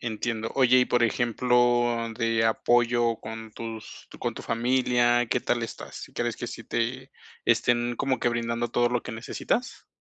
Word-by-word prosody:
Entiendo. 115 0 -3
Oye, 130 -2 +5
y - - +4
por 120 -1 +1
ejemplo, 120 0 +2
de 115 -1 +1
apoyo 120 +1 +2
con 110 0 -8
tus 115 -1 -8
con - - -2
tu - - -8
familia, 120 0 +2
¿qué 125 - +1
tal 120 -1 0
estás? 115 - -7
¿Crees 120 -1 -2
que - - -5
sí 115 - -8
te, 125 +3 -2 0.3
estén 120 0 +2
como 135 +1 0
que 120 - +2
brindando 120 0 -1
todo 120 0 +2
lo 125 0 -1
que 125 - -7
necesitas? 230 - -3
120 Hz, 160 wpm, -26 LUFS, 115-120 Hz, 0.3 s, Oye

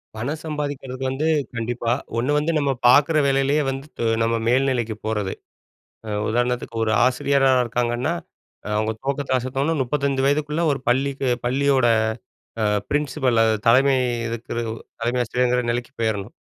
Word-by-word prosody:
பணம் 135 +8 -3
சம்பாதிக்கிறதுக்கு 145 -4 -4
வந்து 145 +4 -1 0.3
கண்டிப்பா, 115 0 -2 0.3
ஒண்ணு 125 +5 0
வந்து 150 +3 +1
நம்ம 140 -2 +1 0.2
பாக்குற 145 +5 +5
வேலைலயே 135 +2 +2
வந்து 135 +2 -5
து 115 - 0 0.2
நம்ம 115 0 +1
மேல்நிலைக்கு 125 -3 +1
போறது, 105 -3 -1 0.7
அ - - -5 0.2
உதாரணத்துக்கு 120 +1 -1
ஒரு 110 - 0
ஆசிரியரா 135 +1 +2
இருக்காங்கன்னா, 120 +4 -1 0.6
அவுங்க 110 +1 0
துவக்கத்த 140 0 -3
அசத்தோன்னா 135 +5 -1
35 135 +1 0
வயதுக்குள்ள 150 +3 +1
ஒரு 140 - -2
பள்ளிக்கு 135 +2 0 0.2
பள்ளியோட 135 0 +2 0.8
அ - - +2 0.3
பிரின்சிபல், 135 -5 0
அ - - +4 0.2
தலைமை 135 +3 +5 0.3
இருக்கிற 115 0 -5 0.5
தலைமை 120 +2 0
ஆசிரியர்ங்கிற 125 +1 +1
நெலைக்கு 120 +2 -3
போயிறணும். 110 -1 -1
130 Hz, 130 wpm, -22 LUFS, 120-140 Hz, 0.8 s, பாக்குற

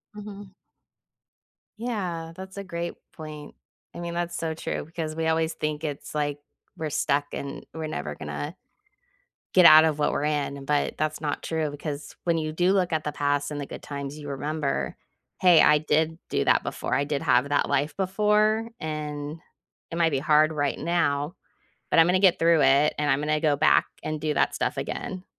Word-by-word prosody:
Mhm. 205 -2 -9 1.3
Yeah, 185 -8 -3
that's 190 +1 -10
a 200 - -4
great 170 -2 -4 0.2
point. 155 -2 -9 0.4
I - - -8
mean, 170 0 -4
that's 175 0 -2
so 160 -1 -2
true 155 - -4
'cause 155 -2 -3
we 160 0 -1
always 160 0 +1
think 155 -1 -3
it's 145 -3 -5
like 145 -1 -1 0.4
we're 160 -1 -3
stuck 145 0 0
and 140 0 -6
we're 160 0 -4
never 75 - -4
gonna 75 - -5 1.0
get 180 -2 +7
out 155 0 +10
of 155 -2 +1
what 150 - +1
we're 145 - -1
in, 145 -2 -1
but 145 +1 0
that's 155 0 -2
not 150 -2 -3
true, 160 -2 -1
because 145 0 -6
when 170 -1 +2
you 155 -1 -2
do 175 +4 +2
look 185 -3 +1
at 155 -1 0
the 150 - -2
past 145 0 0
and 145 -1 -4
the 140 - -5
good - - -9
times, 140 0 -6
you 145 -1 -8
remember, 145 +1 -2 0.4
"Hey, 175 -3 +7
I 150 - +6
did 155 +2 0
do - - +1
that - - +4
before. - - -3
I 140 - +2
did 145 -1 -2
have 135 -3 +3
that 145 - +2
life 145 +3 0
before, 210 +3 +2
and 150 0 -4 0.5
it 165 - -4
might 165 -1 +3
be 140 - 0
hard 155 +1 +4
right 145 -2 -1
now, 160 -2 0 0.6
but - - +3
I'm 165 - +8
gonna 180 +1 +3
get 190 -2 +5
through 165 -1 +4
it, 140 +3 +4
and 150 -1 +1
I'm 135 - +3
gonna 150 +1 0
go 150 -2 +2
back 155 +2 +4 0.2
and 155 0 -3
do 155 -1 -1
that - - +2
stuff - - -1
again." 185 -1 -4
155 Hz, 195 wpm, -26 LUFS, 145-170 Hz, 1.3 s, out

